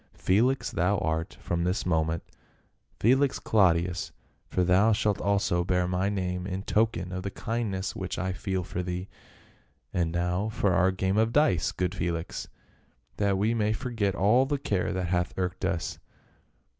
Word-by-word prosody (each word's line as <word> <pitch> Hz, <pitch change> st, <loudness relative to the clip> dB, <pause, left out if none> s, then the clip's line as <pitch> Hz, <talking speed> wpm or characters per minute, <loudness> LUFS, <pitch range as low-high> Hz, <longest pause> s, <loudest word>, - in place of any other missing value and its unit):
" -, -, -38 dB
Felix 120 Hz, +8 st, +2 dB
thou 90 Hz, +5 st, +1 dB
art 80 Hz, -2 st, -2 dB
from 85 Hz, 0 st, -1 dB
this 90 Hz, +4 st, 0 dB
moment. 80 Hz, -1 st, 0 dB, 0.8 s
Felix 130 Hz, +4 st, +3 dB
Claudius 90 Hz, -3 st, +2 dB, 0.2 s
— -, -, -41 dB
for 90 Hz, -, +1 dB
thou 95 Hz, +5 st, +4 dB
shalt 105 Hz, -1 st, 0 dB
also 100 Hz, -3 st, +1 dB
bear 90 Hz, 0 st, +1 dB
my 90 Hz, +2 st, 0 dB
name 90 Hz, -2 st, -2 dB
in 95 Hz, 0 st, -4 dB
token 105 Hz, -5 st, 0 dB
of 90 Hz, 0 st, -3 dB
the 100 Hz, -, -3 dB
kindness 100 Hz, -3 st, -3 dB
which 95 Hz, -1 st, -4 dB
I 95 Hz, 0 st, -1 dB
feel 95 Hz, 0 st, -2 dB
for 90 Hz, -, -4 dB
thee. 90 Hz, +1 st, -4 dB, 0.8 s
And 85 Hz, -2 st, 0 dB
now 90 Hz, +4 st, 0 dB
for 100 Hz, -3 st, +1 dB
our 95 Hz, +1 st, +4 dB
game 95 Hz, +1 st, 0 dB
of 110 Hz, +1 st, +3 dB
dice, 120 Hz, -, +3 dB
good 90 Hz, 0 st, -2 dB
Felix, 85 Hz, -3 st, -3 dB, 0.7 s
that 100 Hz, -2 st, +2 dB
we 105 Hz, +4 st, +2 dB
may 110 Hz, -2 st, +1 dB
forget 110 Hz, -4 st, -1 dB
all 120 Hz, +8 st, +4 dB
the 145 Hz, 0 st, 0 dB
care 100 Hz, -10 st, -1 dB
that 90 Hz, -2 st, -2 dB
hath 90 Hz, 0 st, 0 dB
irked 90 Hz, 0 st, -2 dB
us 95 Hz, -3 st, -2 dB
95 Hz, 170 wpm, -28 LUFS, 90-105 Hz, 0.8 s, thou